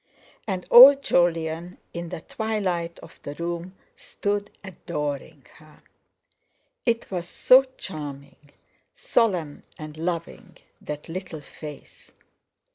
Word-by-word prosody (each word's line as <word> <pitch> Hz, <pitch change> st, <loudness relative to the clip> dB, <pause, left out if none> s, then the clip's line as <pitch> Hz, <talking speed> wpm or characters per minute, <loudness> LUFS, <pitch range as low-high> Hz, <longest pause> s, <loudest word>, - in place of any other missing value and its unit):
And 185 Hz, -3 st, -3 dB
old 275 Hz, +3 st, +10 dB
Jolyon, 170 Hz, 0 st, 0 dB, 0.2 s
in 170 Hz, 0 st, -5 dB
the 160 Hz, -, -6 dB
twilight 185 Hz, -6 st, -2 dB
of -, -, -15 dB
the 145 Hz, -, -7 dB
room, 170 Hz, +2 st, -5 dB, 0.2 s
stood 205 Hz, 0 st, -3 dB
adoring 150 Hz, -7 st, -5 dB
her! 155 Hz, -1 st, -20 dB, 1.0 s
It 230 Hz, -2 st, 0 dB
was 175 Hz, -2 st, -4 dB
so 255 Hz, +1 st, +6 dB, 0.2 s
charming, 145 Hz, -4 st, -8 dB, 0.5 s
solemn, 180 Hz, -11 st, 0 dB, 0.2 s
and 155 Hz, 0 st, -9 dB
loving—that 165 Hz, -3 st, -6 dB
little 170 Hz, -2 st, -6 dB
face. 150 Hz, +1 st, -12 dB
170 Hz, 100 wpm, -25 LUFS, 155-190 Hz, 1.0 s, old